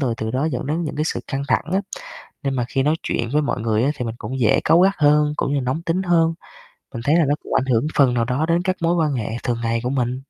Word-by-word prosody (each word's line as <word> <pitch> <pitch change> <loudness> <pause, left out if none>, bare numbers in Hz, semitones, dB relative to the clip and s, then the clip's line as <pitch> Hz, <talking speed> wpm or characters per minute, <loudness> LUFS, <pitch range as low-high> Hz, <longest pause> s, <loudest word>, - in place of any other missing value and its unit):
rồi 125 -5 0
từ 110 0 -3
đó 130 +4 -1
dẫn 135 -5 -2
đến 155 +4 -1
những 150 - -5
cái 150 - 0
sự - - -2
căng 135 +1 -3
thẳng - - +2
á. 190 - +2 0.6
Nên 135 -2 -1
mà 125 -2 0
khi 135 +1 0
nói 150 +3 +2
chuyện 115 0 -2
với 150 +1 +2
mọi 140 - -2
người 110 -1 +1
á 140 - +2
thì 125 - -3
mình 115 -1 -4
cũng 130 +1 -5
dễ 110 -3 +3
cáu 165 - +5
gắt 195 +2 +4
hơn, 150 0 +4
cũng 140 - -1
như 140 - +1
nóng 130 +6 -2
tính 170 +2 -1
hơn, 165 -2 +2 0.6
mình 115 - -5
thấy 150 - +3
là 170 -2 +4
nó 145 +1 +1
cũng - - -6
ảnh 130 - +2
hưởng 125 +1 +1
phần 135 -4 +4
nào 120 -1 +1
đó 125 +6 0
đến 170 +1 +2
các 185 0 0
mối 170 +1 +2
quan 155 -4 +1
hệ 115 -5 -3
thường 120 -1 -1
ngày 115 0 0
của 125 - -1
mình. 125 -1 -1
140 Hz, 295 wpm, -21 LUFS, 125-160 Hz, 0.6 s, cáu